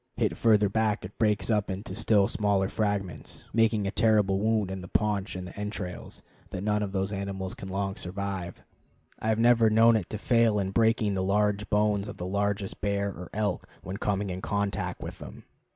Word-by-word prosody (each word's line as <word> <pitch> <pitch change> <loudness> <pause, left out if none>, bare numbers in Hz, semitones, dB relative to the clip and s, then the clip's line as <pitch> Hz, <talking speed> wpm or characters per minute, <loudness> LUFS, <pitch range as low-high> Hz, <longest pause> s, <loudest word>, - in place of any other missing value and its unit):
Hit - - +1
further 105 -2 +4
back 110 0 0
it 95 - -10
breaks 105 0 +1
up 105 -2 +1
into 95 0 -5
still 105 -2 +3
smaller 100 -3 +1
fragments, 100 -4 -3
making 115 -2 +3
a 100 - -1
terrible 105 -4 +3
wound 110 -2 +1
in 95 -1 -5
the 90 - -8
paunch 105 0 0
and 90 -1 -6
entrails 100 -3 -6 0.3
that 95 - -5
none 105 0 +1
of 100 -2 -2
those 95 0 -1
animals 95 -1 -4
can 95 - -8
long 95 0 -2
survive. 95 -1 -5 0.6
I - - -4
have 110 - +2
never 115 -1 +5
known 115 +1 +6
it 105 -6 -1
to 110 - -3
fail 115 0 +3
in 95 -1 -1
breaking 110 -1 +2
the 95 - -1
large 105 +2 +1
bones 105 -1 +2
of - - -7
the 90 - -5
largest 100 +1 -2
bear 100 0 0
or 90 -2 -8
elk 105 0 -2
when 95 +3 -5
coming 100 -2 -1
in 90 +1 -5
contact 100 -3 -2
with - - -7
them. - - -10
100 Hz, 195 wpm, -28 LUFS, 95-105 Hz, 0.6 s, known